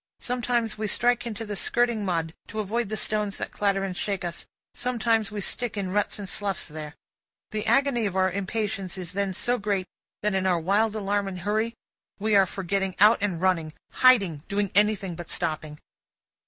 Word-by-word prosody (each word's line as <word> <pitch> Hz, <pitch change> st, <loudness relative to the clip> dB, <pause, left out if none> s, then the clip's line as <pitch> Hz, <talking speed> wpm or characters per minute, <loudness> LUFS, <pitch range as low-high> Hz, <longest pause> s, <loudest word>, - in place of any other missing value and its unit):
Sometimes, 240 Hz, -3 st, -1 dB
we 215 Hz, -, -1 dB
strike 240 Hz, +3 st, +2 dB
into 225 Hz, 0 st, -5 dB
the 205 Hz, -1 st, -4 dB
skirting 235 Hz, +1 st, +1 dB
mud, 165 Hz, -4 st, -1 dB
to 215 Hz, -, -5 dB
avoid 215 Hz, +1 st, -1 dB
the 215 Hz, -, -2 dB
stones 210 Hz, -2 st, +2 dB
that -, -, -4 dB
clatter 200 Hz, -1 st, +1 dB
us -, -, 0 dB
and 185 Hz, -2 st, -4 dB
shake 195 Hz, -1 st, -2 dB
us; 170 Hz, 0 st, -5 dB, 0.3 s
sometimes, 230 Hz, -4 st, 0 dB
we 210 Hz, -1 st, -4 dB
stick 235 Hz, +2 st, -1 dB
in 190 Hz, -2 st, -2 dB
ruts 205 Hz, +1 st, 0 dB
and 200 Hz, -2 st, -6 dB
sloughs 195 Hz, 0 st, -1 dB
there. 150 Hz, -1 st, -8 dB, 0.6 s
The 215 Hz, +1 st, -3 dB
agony 240 Hz, -2 st, +3 dB
of 190 Hz, -, -5 dB
our 190 Hz, 0 st, +3 dB
impatience 195 Hz, -1 st, -2 dB
is 180 Hz, -2 st, -5 dB
then 200 Hz, +1 st, -1 dB
so 240 Hz, +6 st, 0 dB
great, 200 Hz, -2 st, 0 dB, 0.4 s
that 210 Hz, -1 st, +2 dB
in 190 Hz, 0 st, +1 dB
our 180 Hz, -2 st, +3 dB
wild 205 Hz, +6 st, +2 dB
alarm 205 Hz, -1 st, 0 dB
and 185 Hz, -2 st, -5 dB
hurry 215 Hz, +4 st, 0 dB, 0.4 s
we 215 Hz, +1 st, 0 dB
are 195 Hz, -1 st, +6 dB
for 195 Hz, -, -5 dB
getting 195 Hz, +1 st, -1 dB
out 210 Hz, +3 st, +7 dB
and 195 Hz, -5 st, 0 dB
running 165 Hz, -5 st, +1 dB, 0.2 s
hiding 200 Hz, -, +4 dB
doing 200 Hz, -1 st, -1 dB
anything 205 Hz, -3 st, +3 dB
but 170 Hz, 0 st, -8 dB
stopping. 155 Hz, -1 st, -2 dB
200 Hz, 195 wpm, -26 LUFS, 185-220 Hz, 0.6 s, out